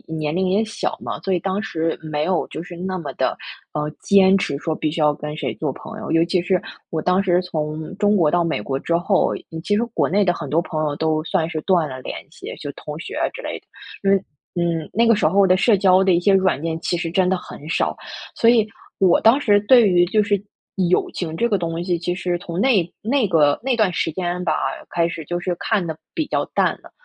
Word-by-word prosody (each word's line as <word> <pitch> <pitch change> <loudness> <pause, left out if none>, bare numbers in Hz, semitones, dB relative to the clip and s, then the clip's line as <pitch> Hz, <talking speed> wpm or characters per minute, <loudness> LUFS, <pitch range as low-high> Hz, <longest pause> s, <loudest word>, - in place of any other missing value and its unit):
年 150 -1 -2
龄 185 +2 0
也 200 +4 +2
小 220 0 -3
嘛， - - -5
所 190 - -1
以 180 - +1
当 190 +3 -2
时 165 -5 -2
没 155 -2 -2
有 185 +1 0
就 160 - -6
是 175 -1 -10
那 185 +1 -3
么 165 -5 -5
地， - - 0 0.5
呃， 150 0 -2
坚 195 -1 +5
持 145 -7 -2
说 160 +2 -2
必 155 - -2
须 155 +1 -3
要 150 -1 +4
跟 150 +1 -6
谁 - - -3
做 150 -3 -2
朋 220 - -9
友， 220 - -7
尤 165 0 +4
其 175 +1 +1
是 180 +1 +1 0.3
我 160 - -1
当 180 +3 +2
时 180 -2 +2
从 155 -2 -4
中 205 0 +3
国 165 -6 +3
到 175 - +3
美 165 -10 -1
国 135 +5 -3
之 170 - 0
后， 185 +3 +2 0.3
其 205 +4 +1
实 220 - +2
国 - - +2
内 205 +2 +3
的 180 -2 +2
很 - - -6
多 165 +3 +2
朋 155 -3 -4
友 145 -1 -1
都 155 0 0
算 160 -1 0
是 160 -2 -3
断 175 -6 +2
了 130 0 -7
联 - - -6 0.2
系， - - -8
就 145 - -6
同 150 +1 -8
学 - - -7 0.2
之 - - -7
类 - - -5
的。 - - -39 0.3
所 195 0 +3
以， - - +4 0.4
嗯， 165 -2 -1
那 230 +2 +3
个 230 - +6
时 205 - +2
候 195 +4 +4
的 185 0 +4
社 210 +3 +4
交 190 -1 +4
的 190 -1 +3
一 170 - +3
些 200 +2 +4
软 190 -7 +2
件 165 0 -2
其 175 - -1
实 170 -1 -3
真 185 +1 +2
的 190 - +2
很 155 -4 -9
少， - - +1 0.4
所 230 - +3
以 230 -3 +5 0.3
我 185 -3 +5
当 230 +5 +5
时 205 -6 +4
对 240 -4 +7
于 175 -1 +4
就 210 +4 +2
是 205 -2 0 0.5
友 180 - +2
情 160 -3 -4
这 235 - +2
个 205 - +2
东 170 -1 -3
西， 175 -1 0
其 175 +1 -2
实 180 -1 -1
从 170 0 -5
那 210 -8 +3
那 245 +1 +1
个 150 -5 +3
那 260 -1 +1
段 215 -5 +2
时 165 - -1
间 180 +1 -3
吧， 160 - +1 0.4
开 170 -1 +1
始 170 -1 -6
就 175 +3 -2
是 175 0 -2
看 210 -5 0
得 160 -1 -4 0.2
比 320 -3 -1
较 - - 0
淡 - - +2
了， - - -16
175 Hz, 270 characters per minute, -21 LUFS, 160-195 Hz, 0.5 s, 对